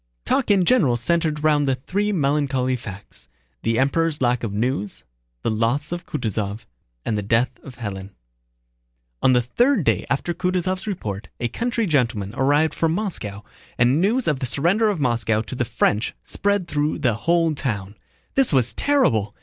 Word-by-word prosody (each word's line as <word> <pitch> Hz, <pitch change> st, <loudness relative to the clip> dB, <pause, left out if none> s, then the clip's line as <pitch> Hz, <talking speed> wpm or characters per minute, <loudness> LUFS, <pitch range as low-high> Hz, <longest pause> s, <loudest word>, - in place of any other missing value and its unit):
Talk 275 Hz, -, +1 dB
in 195 Hz, -3 st, +4 dB
general 160 Hz, -, +3 dB
centered 155 Hz, +3 st, 0 dB
round 145 Hz, -2 st, +3 dB, 0.2 s
three 205 Hz, +2 st, 0 dB
melancholy 140 Hz, -6 st, +1 dB
facts: 105 Hz, -5 st, -10 dB, 0.3 s
the 115 Hz, 0 st, 0 dB
Emperor's 150 Hz, +4 st, +1 dB
lack 125 Hz, -1 st, +1 dB
of 115 Hz, -, -2 dB
news, 105 Hz, -1 st, -2 dB, 0.4 s
the -, -, +1 dB
loss 115 Hz, +8 st, 0 dB
of 175 Hz, 0 st, -5 dB
Kutáysov, 105 Hz, -5 st, -3 dB, 0.4 s
and 110 Hz, -, 0 dB
the 105 Hz, -, -1 dB
death 115 Hz, +5 st, +2 dB
of 130 Hz, -, -11 dB
Hélène. 100 Hz, -5 st, -6 dB, 1.1 s
On 130 Hz, -, +5 dB
the 125 Hz, -1 st, +3 dB
third 240 Hz, -, +2 dB
day -, -, +1 dB
after 140 Hz, +5 st, -1 dB
Kutúzov's 185 Hz, +2 st, -1 dB
report 105 Hz, -, -4 dB
a 120 Hz, -, -1 dB
country 235 Hz, -, -1 dB
gentleman 115 Hz, -, 0 dB
arrived 145 Hz, +5 st, +2 dB
from 165 Hz, -1 st, +1 dB
Moscow, 105 Hz, -, -4 dB, 0.3 s
and 125 Hz, +6 st, +3 dB
news 225 Hz, +5 st, +2 dB
of 150 Hz, -4 st, +1 dB
the 130 Hz, -, -2 dB
surrender 180 Hz, -, +2 dB
of 200 Hz, -6 st, -1 dB
Moscow 115 Hz, -4 st, +1 dB
to -, -, -8 dB
the 120 Hz, -1 st, -1 dB
French 105 Hz, 0 st, 0 dB
spread 200 Hz, -3 st, 0 dB
through 150 Hz, -1 st, 0 dB
the 130 Hz, -7 st, +1 dB
whole 165 Hz, +7 st, +1 dB
town. 105 Hz, -8 st, -3 dB, 0.4 s
This 270 Hz, -2 st, +3 dB
was 130 Hz, -4 st, +2 dB
terrible! 115 Hz, -, +2 dB
135 Hz, 165 wpm, -22 LUFS, 115-170 Hz, 1.1 s, On